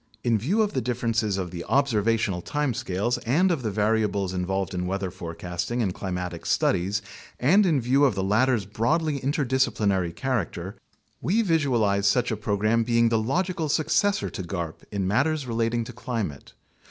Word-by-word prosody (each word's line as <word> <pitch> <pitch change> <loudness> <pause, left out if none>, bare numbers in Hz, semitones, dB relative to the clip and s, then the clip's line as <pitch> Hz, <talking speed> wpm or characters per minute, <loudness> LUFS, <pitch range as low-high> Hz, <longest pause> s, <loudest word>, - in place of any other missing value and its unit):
In 120 -2 +2
view 190 - +2
of 210 - -2
the - - 0
differences 115 -4 0
of 90 -3 -3
the 85 -1 -5
observational 115 -7 +1
time 145 - -1
scales 105 +4 -1
and 165 +11 +2
of 160 -6 0
the 110 - -1
variables 105 -2 0
involved 95 0 -2
in 90 0 -2
weather 95 0 -2
fore 85 -2 -7
casting 90 +8 -3
and 95 -4 -1
climatic 90 -3 -4
studies, 95 +3 +1 0.4
and 190 +10 +4
in 155 -5 +3
view 130 +4 +2
of 130 - +2
the 95 - -1
latter's 110 +2 +2
broadly 140 - 0
inter 145 +2 0
disciplinary 105 -8 +1
character, 95 -3 -3 0.5
we 220 +7 +2
visualize 120 - +2
such 120 +5 +2
a - - 0
program 110 +2 +1
being 115 0 +3
the 115 -1 +2
logical 165 +6 -1
successor 195 +7 +1
to - - -5
garp 85 -3 -4
in 100 -2 -1
matters 140 +8 +1
relating 115 0 0
to 125 - -9
climate. 115 - -5
115 Hz, 170 wpm, -25 LUFS, 95-130 Hz, 0.5 s, and